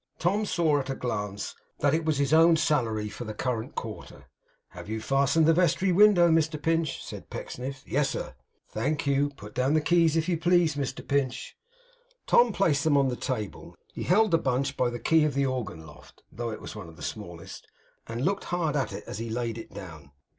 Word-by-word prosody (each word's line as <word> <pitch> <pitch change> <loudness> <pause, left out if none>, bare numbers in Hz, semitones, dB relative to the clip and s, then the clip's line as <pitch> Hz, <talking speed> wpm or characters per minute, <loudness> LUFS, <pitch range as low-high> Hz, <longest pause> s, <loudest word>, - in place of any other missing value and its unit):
Tom 205 +5 0
saw, 160 -6 +2
at 135 -1 -5
a 135 - -2
glance, 105 -5 -4 0.2
that 145 0 +2
it 160 +1 +1
was 155 -2 +1
his 140 +1 +1
own 165 +1 +7
salary 115 -9 0
for 115 - -7
the 110 -2 -6
current 115 -1 -3
quarter. - - -7 0.4
'Have - - -10
you 110 0 -2
fastened 140 +6 +2
the 165 - +5
vestry 180 +2 +2
window, 190 -2 +6
Mr 160 -1 +2
Pinch?' 165 +1 0
said - - -9
Pecksniff. 135 +2 -6
'Yes, 145 -1 +1
sir.' - - -5 0.4
'Thank 145 +8 -1
you. 140 +1 +2
Put 105 -7 -12
down 130 +4 +1
the - - +5
keys 165 0 +3
if 160 - 0
you 170 -3 0
please, 175 -1 +3
Mr 140 -2 -4
Pinch.' 140 -3 -1 0.7
Tom 240 -1 +5
placed 160 -7 +1
them 155 -3 +3
on 135 -1 +3
the 125 - -2
table. 120 -6 -5 0.2
He - - -6
held 210 +4 +3
the 165 - +4
bunch 130 0 -1
by 125 - +1
the 120 - -5
key 160 +5 +3
of 150 -3 0
the 140 0 +2
organ 125 -11 -4
loft 75 -1 -16
(though 120 +1 -4
it 110 - -6
was - - -8
one 100 -6 -8
of 80 - -14
the - - -11
smallest), - - -7 0.4
and 115 +4 -3
looked 200 +1 0
hard 170 -4 -1
at 140 -3 0
it - - -6
as 105 - -6
he 115 0 -4
laid 115 0 -3
it 115 - -10
down. 80 -7 -10
140 Hz, 210 wpm, -27 LUFS, 120-165 Hz, 0.7 s, own